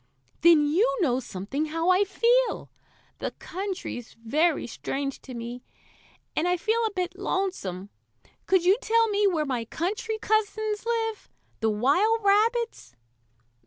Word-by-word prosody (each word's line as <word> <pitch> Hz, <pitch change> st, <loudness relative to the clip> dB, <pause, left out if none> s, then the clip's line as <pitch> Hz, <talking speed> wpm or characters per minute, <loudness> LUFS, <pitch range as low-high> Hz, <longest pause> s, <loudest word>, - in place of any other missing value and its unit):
"Then 325 Hz, -2 st, +6 dB
you 445 Hz, +12 st, +2 dB
know 255 Hz, -7 st, +2 dB
something 245 Hz, +6 st, -4 dB
how 330 Hz, +3 st, +1 dB
I 380 Hz, +3 st, +4 dB
feel. 480 Hz, +5 st, +1 dB, 0.5 s
The -, -, -2 dB
country's 375 Hz, -, -5 dB
very 295 Hz, +8 st, +1 dB
strange 275 Hz, +3 st, -4 dB
to 255 Hz, -, -9 dB
me, 235 Hz, +1 st, -6 dB, 0.7 s
and 320 Hz, -, +1 dB
I 360 Hz, 0 st, +2 dB
feel 445 Hz, +6 st, +1 dB
a 430 Hz, -, -6 dB
bit 365 Hz, 0 st, -3 dB
lonesome. 210 Hz, -, -3 dB, 0.6 s
Could 375 Hz, -2 st, +3 dB
you 390 Hz, +5 st, +5 dB
tell 455 Hz, 0 st, +3 dB
me 410 Hz, 0 st, +3 dB
where 325 Hz, -5 st, +1 dB
my 255 Hz, -4 st, -2 dB
country 405 Hz, -, -3 dB
cousins 435 Hz, 0 st, -1 dB
live 450 Hz, -2 st, -2 dB, 0.3 s
the 225 Hz, -, +1 dB
wild 355 Hz, -, +2 dB
rabbits?" 440 Hz, -, +1 dB
365 Hz, 135 wpm, -26 LUFS, 275-435 Hz, 0.7 s, Then